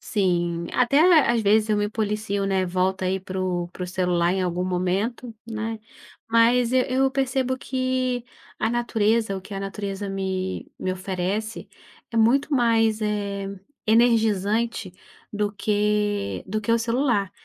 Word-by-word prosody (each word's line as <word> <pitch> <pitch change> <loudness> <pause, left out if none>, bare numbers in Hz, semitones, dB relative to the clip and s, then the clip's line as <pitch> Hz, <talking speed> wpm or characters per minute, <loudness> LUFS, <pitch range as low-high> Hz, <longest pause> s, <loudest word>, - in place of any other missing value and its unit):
Sim, 175 -4 0
até 250 +3 +3 0.3
às 235 - +2
vezes 215 +2 +3
eu 215 - +2
me 205 0 0
policio, 210 -2 -2
né. 190 -1 +1
Volto 185 +1 0
aí 185 +1 0
para 190 0 -5
o 175 -2 -1
para 180 +1 -6
o - - -6
celular 180 -1 +1
em 190 0 0
algum 180 0 -1
momento, 190 +7 -1 0.2
né, 225 0 -3 0.5
mas 230 +1 +4
e 260 - +4
eu 270 +1 +3
percebo 265 -1 0
que 255 -2 -1 0.3
a 220 - +1
natureza, 225 -3 +1
o - - -5
que 200 +2 -9
a 195 - -4
natureza 195 0 -4
me 190 -1 -3
me 185 - -1
oferece, 190 +4 -3 0.4
é 230 - -5
muito 270 +7 +3
mais, 225 -3 +3
eh, 200 -2 -2 0.4
energizante 220 -2 +2 0.4
do 210 -1 -1
que 210 0 0
do 215 +2 -1
que 220 +2 0
o 230 - +4
celular. 230 -4 0
210 Hz, 150 wpm, -24 LUFS, 190-230 Hz, 0.5 s, mas